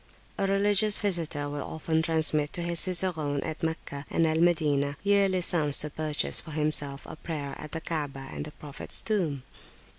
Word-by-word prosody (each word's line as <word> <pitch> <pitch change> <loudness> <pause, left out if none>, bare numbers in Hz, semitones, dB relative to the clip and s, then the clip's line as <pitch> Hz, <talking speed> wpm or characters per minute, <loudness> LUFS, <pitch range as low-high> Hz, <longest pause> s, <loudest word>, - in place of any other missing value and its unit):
A 195 - +1
religious 205 +1 +4
visitor 165 -7 0
will 145 0 -5
often 160 0 -2
transmit 155 -2 +1
to 175 -3 -3
his 170 -1 -1
cicerone 165 -6 +1
at 155 -1 -6
Meccah 155 -3 -4
and 165 - +1
at 160 0 +1
Al - - +1
Madinah 145 -5 +1
yearly 200 -2 +2
sums 155 -5 +2
to 150 - -1
purchase 155 0 +1
for - - -12
himself 150 -2 0
a - - -9
prayer 150 -3 -6
at 150 - -9
the 165 - -3
Ka'abah 145 -5 -5
and - - -5
the 150 - -9
Prophet's 145 -1 +1
Tomb. 165 - -2
160 Hz, 180 wpm, -27 LUFS, 145-175 Hz, -, religious